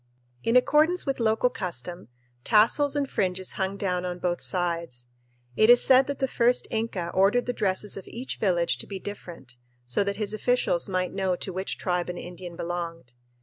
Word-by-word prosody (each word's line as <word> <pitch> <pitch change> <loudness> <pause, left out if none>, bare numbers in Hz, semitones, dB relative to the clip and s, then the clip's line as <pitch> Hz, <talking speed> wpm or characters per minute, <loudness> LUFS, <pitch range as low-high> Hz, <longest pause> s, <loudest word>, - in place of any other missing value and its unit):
In 230 - 0
accordance 305 +7 +3
with 275 -2 -2
local 225 +2 +2
custom, 175 - -5 0.4
tassels 235 - +3
and 285 -1 0
fringes 185 -5 -2
hung 190 0 -3
down 180 -3 -1
on 180 -1 -4
both 175 0 -2
sides. 170 -9 -1 0.5
It 215 - +4
is 245 0 +8
said 265 0 +5
that 280 -1 -3
the 265 - 0
first 245 0 +2
Inca 220 -6 -2
ordered 200 +6 +3
the 245 - -2
dresses 200 -1 -1
of 195 - -9
each 250 +3 -6
village 170 - +1
to - - -7
be 195 - -5
different, 175 -11 -9 0.3
so 125 +11 +1
that 200 0 -2
his 210 0 -1
officials 215 -6 +1
might 185 -1 -1
know 190 -2 0
to 185 +1 -5
which 190 +2 -3
tribe 180 -1 -1
an 175 - -5
Indian 175 0 -8
belonged. 170 -6 -5
190 Hz, 185 wpm, -26 LUFS, 175-230 Hz, 0.5 s, is